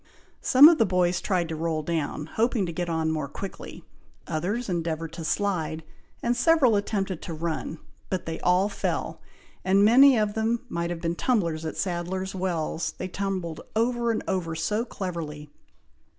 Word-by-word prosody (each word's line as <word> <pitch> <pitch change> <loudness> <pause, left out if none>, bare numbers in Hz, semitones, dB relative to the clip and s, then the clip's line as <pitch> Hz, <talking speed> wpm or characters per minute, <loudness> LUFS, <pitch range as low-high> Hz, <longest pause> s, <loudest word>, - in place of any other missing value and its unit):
Some 275 +3 +8
of 330 -3 +5
the 225 - +5
boys 180 -1 +1
tried 180 -4 0
to 160 - -3
roll 160 -1 -1
down, 155 -2 -2
hoping 225 +3 0
to 170 - -5
get 175 +1 -3
on 160 -1 0
more 155 -3 -2
quickly. 190 +7 -8 0.4
Others 185 +10 -2
endeavoured 165 -3 -2
to 165 - -6
slide, 160 -4 -1 0.4
and 240 +1 +2
several 260 -3 +4
attempted 195 -3 -1
to 165 - -6
run, 160 0 -3 0.3
but 185 -2 -2
they 160 0 -4
all 180 +2 +3
fell; 205 - -3 0.4
and 195 +2 +4
many 260 +4 +7
of 210 -1 +1
them 225 +2 0
might 170 0 -2
have 175 -1 -4
been 165 0 -1
tumblers 170 -7 0
at 160 - -4
Sadler's 185 +1 -2
Wells, 170 -3 -2
they 185 - -4
tumbled 185 -4 -3
over 235 +1 +1
and 225 - 0
over 175 -4 -1
so 210 +9 -1
cleverly. 160 -9 -6
180 Hz, 165 wpm, -26 LUFS, 165-210 Hz, 0.4 s, Some